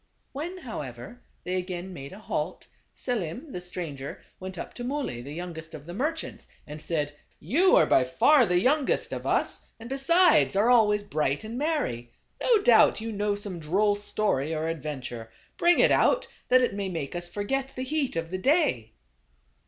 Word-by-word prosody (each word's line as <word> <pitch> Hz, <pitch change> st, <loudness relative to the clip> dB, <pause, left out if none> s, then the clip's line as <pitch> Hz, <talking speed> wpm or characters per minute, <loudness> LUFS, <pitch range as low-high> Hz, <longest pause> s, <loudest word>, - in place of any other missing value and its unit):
When, 330 Hz, +7 st, -5 dB
however, 215 Hz, -, -8 dB, 0.2 s
they 185 Hz, +1 st, -2 dB
again 180 Hz, 0 st, -5 dB
made 140 Hz, -4 st, -8 dB
a 190 Hz, -, -10 dB
halt, 215 Hz, -, -4 dB, 0.3 s
Selim, 245 Hz, -, -4 dB
the 180 Hz, -, -5 dB
stranger, 165 Hz, -6 st, -6 dB, 0.2 s
went 185 Hz, -1 st, -7 dB
up -, -, -6 dB
to 245 Hz, -, -7 dB
Muley, 260 Hz, -, -3 dB
the 140 Hz, +4 st, -9 dB
younger 170 Hz, 0 st, -6 dB
of 145 Hz, -2 st, -9 dB
the 175 Hz, -, -8 dB
merchants, 310 Hz, -, -3 dB, 0.2 s
and 150 Hz, +1 st, -9 dB
said, 150 Hz, -2 st, -2 dB, 0.2 s
" -, -, -38 dB, 0.2 s
You 375 Hz, +1 st, +6 dB
are -, -, +6 dB
by 130 Hz, -, +4 dB
far 240 Hz, -, +4 dB
the 180 Hz, 0 st, +3 dB
youngest 270 Hz, +7 st, +1 dB
of -, -, -5 dB
us, -, -, 0 dB
and 230 Hz, +1 st, -9 dB
besides, 275 Hz, -, +4 dB
are 215 Hz, +5 st, +4 dB
always 210 Hz, -4 st, +4 dB
bright 150 Hz, -7 st, -1 dB
and 220 Hz, +2 st, -6 dB
merry. 255 Hz, -, -2 dB, 0.3 s
No 450 Hz, -5 st, +3 dB
doubt 230 Hz, -2 st, +6 dB
you 225 Hz, +1 st, -4 dB
know 205 Hz, 0 st, 0 dB
some 200 Hz, -4 st, -4 dB
droll 200 Hz, +7 st, +2 dB
story 185 Hz, -7 st, -1 dB
or 160 Hz, +1 st, -1 dB
adventure. 130 Hz, -7 st, -5 dB, 0.3 s
Bring 350 Hz, 0 st, +4 dB
it -, -, +5 dB
out, -, -, +3 dB, 0.2 s
that 255 Hz, 0 st, +5 dB
it 245 Hz, -, +1 dB
may 200 Hz, -1 st, -3 dB
make 160 Hz, -4 st, -4 dB
us 175 Hz, 0 st, -4 dB
forget 265 Hz, +8 st, -2 dB
the 255 Hz, -, -3 dB
heat 280 Hz, -, -1 dB
of 165 Hz, 0 st, -3 dB
the 185 Hz, -, -3 dB
day." 220 Hz, -, +1 dB
200 Hz, 185 wpm, -27 LUFS, 155-255 Hz, 0.3 s, You